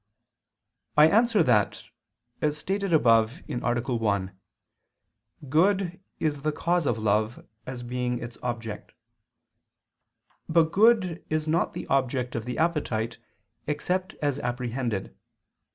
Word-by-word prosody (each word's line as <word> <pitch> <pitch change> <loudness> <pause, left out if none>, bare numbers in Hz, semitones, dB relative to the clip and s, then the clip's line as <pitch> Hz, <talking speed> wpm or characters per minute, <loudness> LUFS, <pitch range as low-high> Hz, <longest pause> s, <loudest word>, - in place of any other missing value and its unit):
I 150 +1 +8
answer 225 -3 +4
that, 115 -7 +2 0.6
As 150 0 +1
stated 195 +4 -2
above 115 -5 +3
(A. - - -5
1), 115 -6 -1 1.1
good 180 +5 +2 0.2
is 145 -3 -1
the 155 +2 0
cause 170 +1 0
of 115 - +1
love, 110 +1 0 0.2
as 125 -1 -6
being 125 0 -2
its 120 -1 -7
object. 115 -3 -5 1.6
But 160 0 +3
good 200 -5 +3
is 155 0 -1
not 165 +2 +1
the - - -5
object 130 -2 0
of 115 -1 -3
the 125 - -4
appetite, 125 -9 -1 0.5
except 180 +5 -1
as 145 -1 0
apprehended. 120 -4 -3
130 Hz, 115 wpm, -27 LUFS, 120-165 Hz, 1.6 s, I